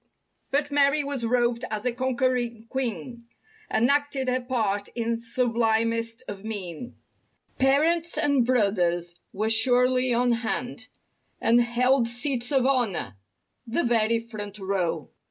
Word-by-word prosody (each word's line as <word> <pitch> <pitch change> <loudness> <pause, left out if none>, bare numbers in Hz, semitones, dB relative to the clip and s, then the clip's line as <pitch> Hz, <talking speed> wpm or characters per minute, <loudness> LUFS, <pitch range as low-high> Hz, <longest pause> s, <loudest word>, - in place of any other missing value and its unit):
But 285 +1 0
Mary 285 +1 +3
was 280 -3 -4
robed 240 0 +1
as 215 +1 -4
a 250 - +2
conquering 245 -2 -1
queen 235 - -4 0.4
And 235 - +2
acted 285 -2 0
her 255 0 0
part 220 -6 -1
in 230 -1 -1
sublimest 230 0 0
of 200 -1 -7
mien. 205 -1 -6 0.6
Parents 320 +6 +2
and 285 -4 +3
brothers 180 -8 +1 0.2
were 215 +3 -2
surely 250 +2 +3
on 245 +1 +2
hand 245 +1 -3 0.5
And 235 +1 +4
held 240 +1 +2
seats 245 +1 -1
of 265 -3 +3
honor—the 230 - -2
very 230 -1 +2
front 215 -3 -8
row. 180 -6 -2
240 Hz, 120 wpm, -26 LUFS, 220-255 Hz, 0.6 s, And